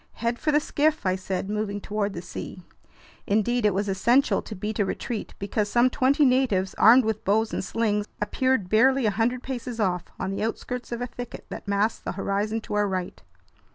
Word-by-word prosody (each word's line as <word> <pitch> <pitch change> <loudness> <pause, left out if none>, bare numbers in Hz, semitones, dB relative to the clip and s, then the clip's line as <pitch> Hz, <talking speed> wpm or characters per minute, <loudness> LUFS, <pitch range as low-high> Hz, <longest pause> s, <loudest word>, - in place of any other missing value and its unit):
"Head 235 +1 -2
for 305 - +1
the 295 - +4
skiff!" 305 -2 0
I 185 0 +2
said, 190 0 -3
moving 210 -1 -2
toward 205 -1 -2
the 170 - -6
sea. 180 - -8 0.6
Indeed, 220 +2 +2
it 205 - +1
was 200 +1 0
essential 235 +8 +3
to 215 - -8
beat 210 +3 -4
a - - +4
retreat 215 +3 -4
because 205 +1 -1
some 240 +3 +3
twenty 280 +3 +3
natives, 250 -8 +2
armed 240 +2 +6
with 220 -1 -2
bows 215 +3 +1
and - - -2
slings, 210 0 0
appeared 235 0 0
barely 255 +5 +4
a 215 - +3
hundred 235 +4 0
paces 250 -2 -5
off, 180 -4 0
on 190 - -2
the 195 - -3
outskirts 245 +3 -4
of 235 +1 -3
a - - -1
thicket 245 -1 -8
that - - -8
masked 205 +2 0
the - - -3
horizon 205 +3 -1
to - - -7
our 210 0 +2
right. 185 - -4
215 Hz, 200 wpm, -25 LUFS, 200-245 Hz, 0.6 s, armed